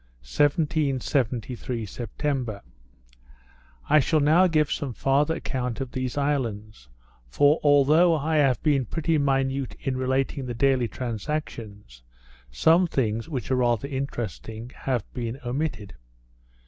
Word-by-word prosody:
_ - - -34 0.2
1773 130 - 0
September 120 +1 -4 1.2
I 155 +1 +5
shall 155 +3 +2
now 160 +6 +5
give 155 -3 +1
some 135 -4 -3
farther 140 +6 +1
account 125 -7 -3
of 135 -2 -4
these 130 +1 -3
islands; 110 - -2 0.4
for, 145 - +3
although 150 +4 +5
I 155 +2 0
have 135 -5 +3
been 140 -5 +2
pretty 165 +2 0
minute 135 -1 0
in 135 - -2
relating 130 +1 -1
the 120 - -4
daily 130 -1 +2
transactions, 110 - -5 0.5
some 165 - +4
things, 115 -4 -1
which 135 -4 -4
are - - +3
rather 120 +1 +1
interesting, 120 - -5
have 125 -5 -2
been 120 +1 -4
omitted. 120 -7 -3
135 Hz, 120 wpm, -25 LUFS, 115-145 Hz, 1.2 s, I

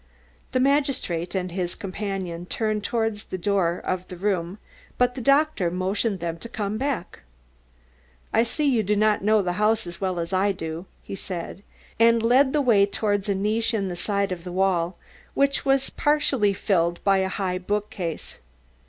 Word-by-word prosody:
The 255 - +1
magistrate 260 - +1
and 185 -1 -2
his 180 -1 -3
companion 190 -4 -4
turned 215 -1 -1
towards 225 -2 -1
the 185 - -5
door 180 -2 +1
of 185 0 -2
the 180 - -8
room 185 -1 -1 0.4
but 250 0 +3
the 255 - -6
doctor 275 - +3
motioned 190 +3 -1
them 170 -1 -4
to 235 - -8
come 215 -2 -3
back. 270 -10 -3 1.1
"I 225 - +5
see 265 +6 -1
you 245 -5 +3
do 210 0 +1
not 210 0 +2
know 215 0 +4
the 180 -1 -1
house 220 0 +3
as 175 +1 -9
well 185 -2 -1
as 170 +2 -4
I 195 +2 +2
do," 165 0 -6 0.2
he - - -8
said, 185 -1 -5 0.4
and 230 0 +5
led 260 +4 +5
the 300 - +2
way 215 -7 +4
towards 205 0 -1
a 200 - +2
niche 220 +4 0
in 195 -3 -1
the 175 - -4
side 200 +2 -1
of 175 -2 -4
the 180 - -6
wall, 180 -2 +1 0.4
which 280 +1 +2
was 270 0 +2
partially 280 -8 +2
filled 175 -3 0
by 195 -1 +4
a 190 - +1
high 185 -2 -2
bookcase. 190 -3 -3
200 Hz, 180 wpm, -25 LUFS, 180-225 Hz, 1.1 s, I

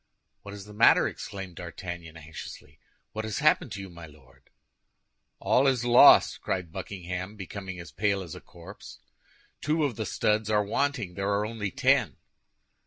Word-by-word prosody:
"What 100 0 -9
is 100 -1 -10
the 105 - -12
matter?" 105 - +5
exclaimed 95 -4 -7
D'Artagnan, 85 -1 -8
anxiously; 75 -2 -11 0.3
"what 110 - -4
has 110 -1 -4
happened 150 -4 +2
to 100 - -6
you, 95 - -7
my 85 -2 -11
Lord?" 65 -4 -21 0.9
"All 135 +2 +2
is 125 -3 +1
lost!" 120 0 +7
cried 90 -4 -3
Buckingham, 95 +2 -6
becoming 95 -1 -7
as 85 - -10
pale 100 0 0
as 85 - -9
a - - -10
corpse; - - -13 0.6
"two 155 +1 +1
of 135 -7 -1
the 110 - -3
studs 105 0 0
are 105 -1 +3
wanting, 120 -2 -1
there 100 +2 -2
are 100 +1 +1
only 105 -2 -4
ten." - - +2
100 Hz, 165 wpm, -27 LUFS, 90-110 Hz, 0.9 s, lost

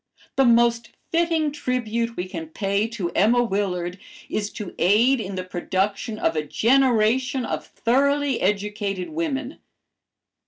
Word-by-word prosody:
The 270 - +4
most 235 0 +3 0.2
fitting 330 -2 +1
tribute 235 -4 -2
we 180 - -3
can 165 -3 -6
pay 200 +5 -1
to 205 -7 -4
Emma 235 +5 +3
Willard 185 -4 -2 0.3
is 210 -1 -2
to 210 -5 -7
aid 230 +8 +4
in 195 -2 -5
the 185 - -3
production 195 +4 -2
of 165 - 0
a 155 - +1
generation 250 - +2
of - - -4
thoroughly 280 +2 +1
educated 200 -1 -1
women. 300 -3 -3
225 Hz, 130 wpm, -23 LUFS, 195-260 Hz, 0.3 s, The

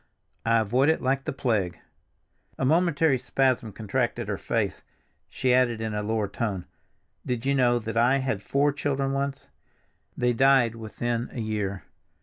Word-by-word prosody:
I 115 0 +4
avoid 120 +6 +2
it 160 - +2
like 135 +1 0
the - - -1
plague!" 110 -10 -1 0.8
A 130 - 0
momentary 160 -2 +3
spasm 130 -3 0
contracted 105 0 -2
her - - -1
face; - - -1 0.5
she 130 -1 +1
added 125 -3 +3
in 110 -1 -3
a 105 - -1
lower 110 0 -1
tone, 100 -3 -3 0.6
"Did 125 -1 -3
you 140 - +2
know 125 -3 +3
that 115 -1 -5
I 125 +4 +4
had 130 -7 -2
four 140 +5 +1
children 140 -1 -1
once? 140 0 -3 0.7
They 125 0 +2
died 130 -2 +4
within 115 +1 -3
a - - -5
year." 105 -3 -3
120 Hz, 155 wpm, -26 LUFS, 110-135 Hz, 0.8 s, I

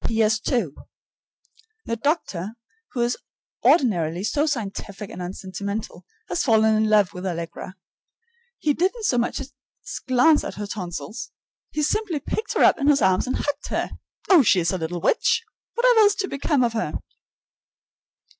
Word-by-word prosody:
P.S. 220 -1 +2
II. 235 - +1 1.2
The 230 - -1
doctor, 225 - -2 0.4
who 245 - -1
is 240 +1 +1 0.5
ordinarily 180 - +3
so 290 +8 +1
scientific 210 -6 -4
and - - -7
unsentimental, 195 +3 -5 0.2
has 350 - -1
fallen 220 -3 +4
in 215 0 +2
love 210 -4 +4
with 180 - -7
Allegra. 175 +1 -5 0.8
He 295 - +1
didn't 385 - 0
so 245 - +2
much 235 - -1
as 270 0 -7 0.6
glance 270 +5 +5
at - - -5
her 205 - -4
tonsils; 185 - -6 0.4
he 300 - -2
simply 380 -1 0
picked 435 +9 -3
her - - +4
up - - +5
in 280 - 0
his 285 -6 +4
arms 190 +4 +3
and 255 - -1
hugged 290 0 -2
her. - - -2 0.4
Oh, 365 -5 +7
she 200 -6 +4
is 165 -1 +1
a 185 - -2
little 165 +1 -3
witch! 465 - +2 0.3
Whatever 485 -1 +5
is 415 -1 +6
to 390 - -2
become 275 -2 +1
of 235 -1 +1
her? 225 - -2
230 Hz, 160 wpm, -24 LUFS, 195-295 Hz, 1.2 s, Oh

